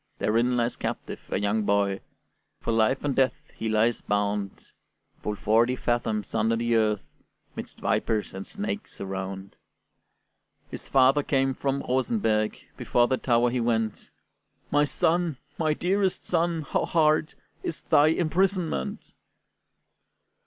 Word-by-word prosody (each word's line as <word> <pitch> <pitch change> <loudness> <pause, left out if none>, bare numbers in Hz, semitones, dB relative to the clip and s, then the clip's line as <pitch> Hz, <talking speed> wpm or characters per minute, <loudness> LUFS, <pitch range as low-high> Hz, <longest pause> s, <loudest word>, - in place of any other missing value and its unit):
Therein 120 +3 +1
lies 120 0 0
captive - - -4
a - - 0
young 105 +2 +1
boy, 100 -1 +1 0.6
For - - -2
life 115 +4 +2
and 140 -3 0
death 135 +3 0
he 110 - -3
lies 110 +2 +2
bound, 100 -1 -2 0.5
Full 105 - -2
forty 115 +5 +2
fathoms 115 -4 -1
under 115 +1 +2
the 115 0 +1
earth, 105 -2 +2 0.5
'Midst - - -8
vipers 110 -2 0
and 95 0 -7
snakes 205 0 -5
around. 95 0 -5 1.1
His - - -8
father 135 +2 +5
came 135 -1 +1
from 140 +1 -2
Rosenberg, 125 - +1 0.2
Before 120 0 +2
the 130 - +1
tower 120 -1 +2
he 125 - 0
went: 115 -2 -1 0.6
"My 145 +1 +4
son, 170 -1 +1 0.2
my 155 -2 +2
dearest 190 +2 0
son, 170 -2 0
how - - -1
hard 155 -2 +2 0.3
Is 160 - -5
thy 145 +1 +5
imprisonment!" 180 +5 0
125 Hz, 130 wpm, -26 LUFS, 110-155 Hz, 1.1 s, father